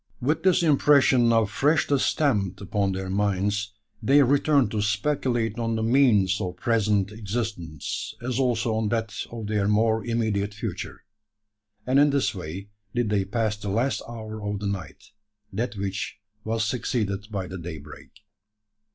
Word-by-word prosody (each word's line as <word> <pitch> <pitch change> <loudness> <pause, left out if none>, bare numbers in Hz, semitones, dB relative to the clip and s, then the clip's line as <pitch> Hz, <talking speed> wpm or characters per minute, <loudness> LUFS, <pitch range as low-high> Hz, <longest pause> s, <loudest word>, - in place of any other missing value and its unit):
With 145 +6 0
this 185 -2 +3
impression 140 -5 +5
now 115 -1 +4
freshly 145 +5 +2
stamped 100 - +1
upon 100 0 -1
their 95 0 -4
minds, 105 +1 0 0.3
they 140 +6 +5
returned 140 -3 +3
to 110 - -1
speculate 115 +1 0
on 115 -1 -1
the 110 - -1
means 110 -6 +3
of 90 -2 -3
present 105 -4 +1
existence, 100 - -4
as 125 +2 -2
also 120 -3 +1
on 110 -1 0
that 115 -1 -1 0.2
of 115 -2 -6
their 105 -1 0
more 110 +1 +2
immediate 110 -3 -1
future; 105 - -6 0.8
and 130 +2 +3
in 145 +1 +6
this 140 -1 +1
way 95 +2 -7 0.3
did 120 -3 0
they 100 -2 +1
pass 110 +1 -1
the 105 -1 -5
last 120 +7 0
hour 110 -2 -7
of 105 0 -2
the 105 - -5
night 100 -2 -5 0.4
that 120 +4 -2
which 100 +1 -4 0.3
was 110 0 -1
succeeded 105 -3 -2
by 100 -3 -3
the 90 +1 -7
daybreak. 80 -3 -9
110 Hz, 150 wpm, -25 LUFS, 100-120 Hz, 0.8 s, in